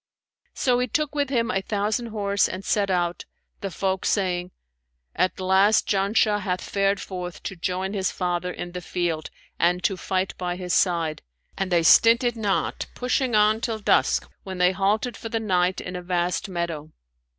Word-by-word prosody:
So 250 -2 +2
he 250 - 0
took 300 +5 -1
with 285 -2 0
him 235 -3 +1
a 195 - 0
thousand 210 +3 -1
horse 200 -2 +1
and 185 +1 -6
set 200 -2 +1
out, 175 -2 -1 0.3
the 195 - -4
folk 190 +1 -2
saying, 180 -3 0 0.7
'At 185 - 0
last 190 +3 +3
Janshah 205 +1 +2
hath 185 -3 -3
fared 195 0 +1
forth 180 -3 -6
to 195 - -5
join 185 +2 -2
his 190 -2 0
father 180 -1 -2
in 175 0 -6
the 180 0 -6
field, 170 -2 -2 0.3
and 180 +1 +2
to 195 - +1
fight 185 +1 -2
by 180 -1 -2
his 180 -1 -3
side;' 170 -4 +1 0.3
and 195 -1 -2
they 170 -1 +3
stinted 235 - +5
not 210 -4 -1
pushing 250 -1 0
on 215 +1 +4
till 225 -2 -1
dusk, 215 - +2
when 190 -1 -7
they 180 0 +4
halted 205 +5 0
for 225 - -7
the 225 - -1
night 185 -4 +1
in 180 - -6
a 180 - -4
vast 180 +2 -1
meadow. 170 -4 -3
190 Hz, 175 wpm, -24 LUFS, 180-215 Hz, 0.7 s, stinted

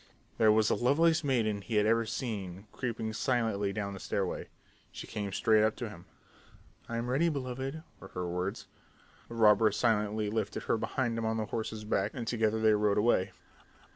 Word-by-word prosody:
There 110 -1 +6
was 110 0 +3
the - - +3
loveliest 160 +6 +3
maiden 110 -7 +1
he 110 +3 -4
had 105 0 +4
ever 115 +1 +2
seen 100 -5 -4
creeping 115 -3 -3
silently 110 -4 0
down 100 -1 -3
the 95 - -8
stairway. 95 -1 -2 0.4
She - - -8
came 100 -2 -4
straight 110 +2 +3
up 110 0 +2
to 120 -3 -5
him. 85 -5 -12 0.8
"I'm 115 +1 -2
ready, 140 +7 +2
beloved," 135 +1 -4 0.2
were - - -10
her 90 -2 -4
words. 90 +5 -3 0.6
The 115 - -7
robber 110 -1 +5
silently 105 -1 +1
lifted 110 -2 -2
her - - +1
behind 115 +1 -1
him 115 - -2
on 110 0 0
the 110 - -1
horse's 110 0 -4
back 105 0 -1
and 120 -3 -4
together 110 -1 0
they 110 -1 +4
rode 105 -1 +2
away. 105 -3 +2
110 Hz, 180 wpm, -31 LUFS, 105-120 Hz, 0.8 s, There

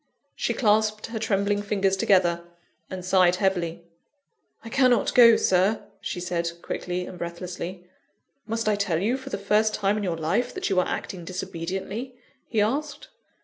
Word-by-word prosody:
She - - -1
clasped 215 -1 +2
her 225 -1 -5
trembling 205 -1 0
fingers 195 -2 +1
together, 180 -3 +2 0.5
and 185 -1 -6
sighed 185 -1 +4
heavily. 175 -3 -1 0.8
"I - - -6
cannot 250 -3 +3
go, 235 -2 +8
Sir," 190 +2 +2 0.2
she - - -4
said 175 -1 -1
quickly 180 0 -3
and 180 - -10
breathlessly. 175 +1 -6 0.6
"Must 225 0 -2
I 210 - +3
tell 200 -5 0
you 220 +7 +1
for 265 - -7
the - - -3
first 210 +2 +2
time 205 0 +1
in 210 - -2
your 175 -4 -1
life, 180 +10 -1
that 370 - -2
you 185 - +3
are 180 - +1
acting 180 -3 -4
disobediently?" 190 +7 -5 0.3
he 220 - +1
asked. 280 +7 -2
195 Hz, 160 wpm, -25 LUFS, 180-215 Hz, 0.8 s, go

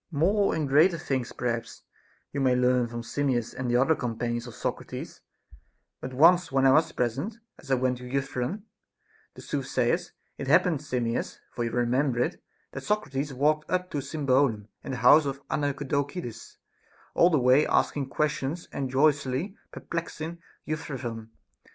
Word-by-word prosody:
More 190 +6 +2
and 155 -3 -1
greater 160 +6 +5
things 130 -5 -2
perhaps 120 -2 -4 0.5
you 140 - -2
may 130 -2 +3
learn 125 -1 +3
from 120 0 -6
Simmias 125 -2 -1
and 125 -2 -3
other 135 +6 +4
companions 120 -2 -3
of 120 - -10
Socrates; - - -5 0.8
but 130 - -6
once 170 +6 +5
when 135 0 +3
I 135 - +7
was 155 +4 +4
present, 135 - -2 0.2
as - - -14
I 135 - +4
went 125 0 0
to 125 0 -9
Euthyphron 135 - -2 0.7
the - - -11
soothsayer's, - - -1 0.3
it - - -4
haj^pened, 165 -6 +4
Sim 130 -5 -2
mias, 115 +1 -2
— - - -39
for 120 - -2
you - - -1
remember 125 +2 +1
it, 125 - -1 0.2
— - - -42
that - - -6
Socrates 145 -9 -1
walked 150 +3 +1
up 180 0 -1
to 145 - -1
Symbolum 135 -6 +1
and - - -5
the 120 0 -5
house 150 +3 +7
of 140 0 -6
Andocides, 140 -2 -3 0.6
all 170 - +5
the 160 - +3
way 130 +3 +4
ask - - +2
ing 140 -2 -3
questions 150 +2 -1
and 135 -2 -3
jocosely 140 +4 +1 0.2
perplexing 170 0 -5 0.3
Euthyphron. 125 -7 -5
135 Hz, 165 wpm, -27 LUFS, 125-155 Hz, 0.8 s, I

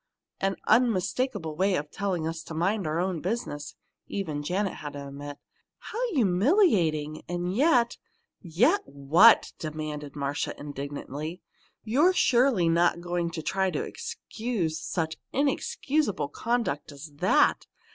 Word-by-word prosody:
"An 195 0 0
unmistakable 220 - +1
way 190 +3 +2
of 150 -1 -3
telling 185 -5 -2
us 165 0 -4
to 165 - -7
mind 190 +2 0
our 155 +2 -1
own 180 -2 -1
business!" 180 -8 -4 0.3
even 160 -7 -3
Janet 185 +5 -1
had 145 -1 -7
to 140 -1 -7
admit. 145 +1 -8 0.4
"How 485 +1 -3
humiliating! 185 - +2
And 175 +1 -2
yet 250 -3 +3 0.3
" - - -59 0.2
"Yet 390 +10 +5
what?" 160 +11 +5
demanded 150 -2 -5
Marcia, 140 0 -3
indignantly. 145 +3 -6 0.4
"You're 290 +12 +3
surely 245 - +3
not 170 +1 +3
going 175 -1 -2
to 165 -1 -6
try 190 +2 +1
to - - -2
excuse 215 -9 -4
such 160 -2 -2 0.2
inexcusable 275 - 0
conduct 230 - -2
as 145 +2 -10
that! 185 - +3
175 Hz, 130 wpm, -27 LUFS, 155-230 Hz, 0.4 s, Yet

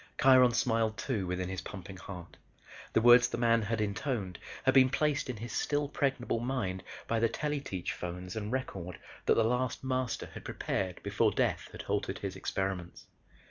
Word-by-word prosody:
Kiron 130 -2 +7
smiled 115 -3 +1
too 110 -9 -2
within 90 0 -2
his 95 0 -4
pumping 95 -1 -8
heart. 90 -1 -9 0.6
The - - +4
words 120 0 +8
the - - -3
Man 115 -1 +4
had 110 +1 -1
intoned 105 -3 -2 0.2
had - - +4
been 130 -1 +7
placed 145 0 +1
in 125 - -3
his 120 +3 -6
still 145 0 0
pregnable 135 -5 0
mind 115 -8 -2 0.3
by 115 - +1
the 115 0 +3
tele 150 +4 -1
teach 95 -10 -4
phones 90 +1 -6
and 105 0 -3
record 95 -10 -3 0.3
that - - +6
the 115 - +4
last 125 +3 0
Master 130 -2 -1
had - - -8
prepared 95 -2 -3
before - - +2
death - - 0
had - - -7
halted - - -1
his - - -4
experiments. 95 -3 -3
115 Hz, 180 wpm, -31 LUFS, 95-130 Hz, 0.6 s, words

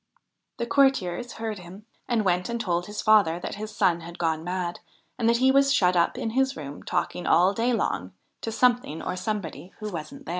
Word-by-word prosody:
The 235 - -2
courtiers 245 -4 +2
heard 220 -3 -4
him 185 +4 -12 0.2
and 230 -4 +1
went 180 +1 +1
and 235 0 -2
told 175 -5 -1
his 210 0 -5
father 205 -6 +4
that - - -5
his 215 +2 -6
son 170 -2 +3
had 170 +1 -9
gone 160 -1 0
mad, 180 0 -3 0.4
and 230 -1 +3
that 235 - +4
he 260 +2 +4
was 275 +1 +4
shut 185 -9 +3
up 170 -1 +2
in 225 - -2
his 265 +2 +1
room, 145 -2 -7
talking 180 - -2
all 180 +3 +5
day 230 +4 +1
long 95 - -1 0.3
to 225 - -3
something 235 -8 +1
or 185 - -3
somebody 185 -2 -4
who 215 -1 -5
wasn't 155 -3 -7
there. - - -9
200 Hz, 210 wpm, -26 LUFS, 175-235 Hz, 0.4 s, all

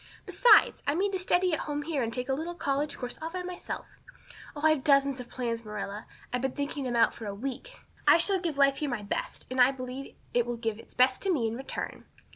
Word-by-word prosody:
Besides, 485 - +5
I 285 - +2
mean 390 +3 +1
to 380 - -1
study 360 -1 +2
at - - +1
home 295 0 -2
here 295 -2 -1
and 230 -1 -1
take 250 +1 -2
a 265 - +1
little 325 +5 -3
college 290 -2 -1
course 250 -1 -6
all 320 - -3
by 365 +1 -4
myself. 360 0 -6 0.7
Oh, 290 - -6
I've 310 -4 +4
dozens 275 -2 +4
of 245 - -8
plans, 235 -2 -3
Marilla. 210 0 -6 0.3
I've 250 - 0
been 265 0 -1
thinking 285 -1 -3
them 245 -1 -2
out 230 - +4
for 225 - -8
a 200 - -4
week. 270 - -6 0.3
I - - +8
shall 380 +3 +3
give 335 -5 -3
life 275 -1 +4
here 300 - -2
my 235 -5 -3
best, 200 - -4
and 255 0 +2
I 250 - +8
believe 260 0 -6 0.2
it 240 -1 +2
will 240 -1 -2
give 225 -2 -3
its - - -14
best 255 +1 +4
to 390 - +1
me 270 -10 +1
in 220 - -3
return. 265 +2 -6
275 Hz, 245 wpm, -29 LUFS, 245-315 Hz, 0.7 s, I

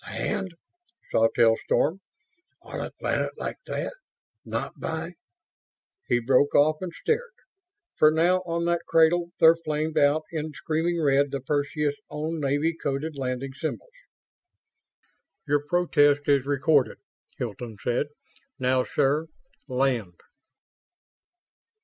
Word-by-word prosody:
"Land!" 185 -3 -3 0.6
Sawtelle 115 0 +4
stormed. 165 +6 +1 0.6
"On - - -7
a - - -4
planet - - -2
like - - -4
that? - - -3 0.5
Not - - -4
by - - -4 0.4
..." 390 - -54
He - - +4
broke 130 +4 +3
off 155 +2 +5
and 185 -2 -4
stared; 470 - -2 0.6
for 155 - +7
now, 165 +4 +3
on 170 0 -1
that 170 0 +1
cradle, 170 +1 +4
there 165 0 +8
flamed 155 -1 -2
out 145 +2 +3
in 155 -1 -4
screaming 165 +4 -1
red 140 -2 +3
the 140 - -3
Perseus' 145 +1 -1
own 155 +2 -3
Navy 145 +3 +1
coded 150 +1 -3
landing 135 0 -3
symbols! 160 - -5 1.6
"Your 145 0 +2
protest 145 -5 +3
is 140 -2 +3
recorded," 140 -1 +2 0.4
Hilton 115 -1 -5
said. 125 +4 +1 0.5
"Now, 130 0 +2
sir, 145 +6 +1 0.4
land." 125 -9 -1
145 Hz, 120 wpm, -26 LUFS, 135-165 Hz, 1.6 s, there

